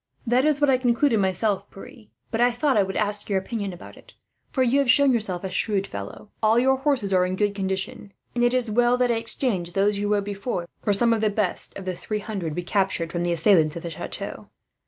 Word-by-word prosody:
"That 250 Hz, +3 st, +2 dB
is 300 Hz, -2 st, +2 dB
what 290 Hz, -2 st, +4 dB
I 255 Hz, -, +3 dB
concluded 240 Hz, -1 st, +2 dB
myself, 195 Hz, +1 st, 0 dB
Pierre; 225 Hz, +2 st, -13 dB, 0.2 s
but 225 Hz, -, -1 dB
I 245 Hz, -, +5 dB
thought 255 Hz, +3 st, 0 dB
I 205 Hz, -, +5 dB
would 190 Hz, 0 st, -2 dB
ask 210 Hz, 0 st, 0 dB
your 200 Hz, -, +1 dB
opinion 200 Hz, 0 st, -3 dB
about 175 Hz, -, -12 dB
it, -, -, -17 dB, 0.3 s
for 260 Hz, -, +1 dB
you 255 Hz, +3 st, +3 dB
have 275 Hz, -3 st, +1 dB
shown 275 Hz, +1 st, +5 dB
yourself 200 Hz, -6 st, -1 dB
a 190 Hz, -, -4 dB
shrewd 195 Hz, 0 st, 0 dB
fellow. 100 Hz, -, -8 dB
"All 220 Hz, +1 st, +4 dB
your 265 Hz, +2 st, +3 dB
horses 265 Hz, -8 st, 0 dB
are 180 Hz, -1 st, +4 dB
in 180 Hz, 0 st, -1 dB
good 205 Hz, +1 st, 0 dB
condition, 195 Hz, +1 st, -4 dB, 0.2 s
and 240 Hz, -, 0 dB
it 240 Hz, +1 st, +3 dB
is 245 Hz, -3 st, 0 dB
well 240 Hz, +2 st, +3 dB
that 250 Hz, -1 st, +2 dB
I 230 Hz, -, +1 dB
exchanged 220 Hz, -6 st, -1 dB
those 200 Hz, +1 st, +2 dB
you 205 Hz, 0 st, -1 dB
rode 205 Hz, -1 st, +2 dB
before, 200 Hz, -3 st, -4 dB
for 205 Hz, -, 0 dB
some 230 Hz, +3 st, +3 dB
of 225 Hz, -, -1 dB
the 215 Hz, -, +2 dB
best 205 Hz, -3 st, -2 dB
of 195 Hz, -, -8 dB
the 185 Hz, -, -2 dB
three 215 Hz, +4 st, -4 dB
hundred 195 Hz, -7 st, -4 dB
we 175 Hz, -, -3 dB
captured 190 Hz, -3 st, -1 dB
from 175 Hz, 0 st, -2 dB
the 175 Hz, 0 st, 0 dB
assailants 165 Hz, -2 st, +3 dB
of 170 Hz, -, -6 dB
the 170 Hz, -, -5 dB
chateau. -, -, -7 dB
210 Hz, 240 wpm, -24 LUFS, 190-240 Hz, 0.3 s, I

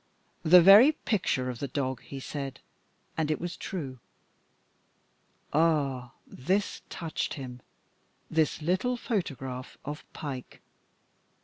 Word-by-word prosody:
The 175 Hz, +2 st, +8 dB
"very 210 Hz, -, +9 dB
pictur'" 185 Hz, -, 0 dB
of 125 Hz, -2 st, -4 dB
the 140 Hz, -, -2 dB
dog, 130 Hz, -2 st, -2 dB
he 135 Hz, -, -8 dB
said, 140 Hz, 0 st, -5 dB, 0.6 s
and 160 Hz, -2 st, 0 dB
it 155 Hz, -, 0 dB
was 175 Hz, 0 st, -4 dB
true. 140 Hz, -, -5 dB, 1.5 s
Ah! 145 Hz, -6 st, +1 dB
this 190 Hz, +10 st, -1 dB
touched 165 Hz, -3 st, -3 dB
him, 125 Hz, -3 st, -8 dB, 0.7 s
this 160 Hz, -1 st, +1 dB
little 190 Hz, +10 st, +1 dB
photograph 135 Hz, -, -4 dB
of 150 Hz, +1 st, -5 dB
Pike. 135 Hz, -4 st, -7 dB
150 Hz, 110 wpm, -29 LUFS, 130-180 Hz, 1.5 s, very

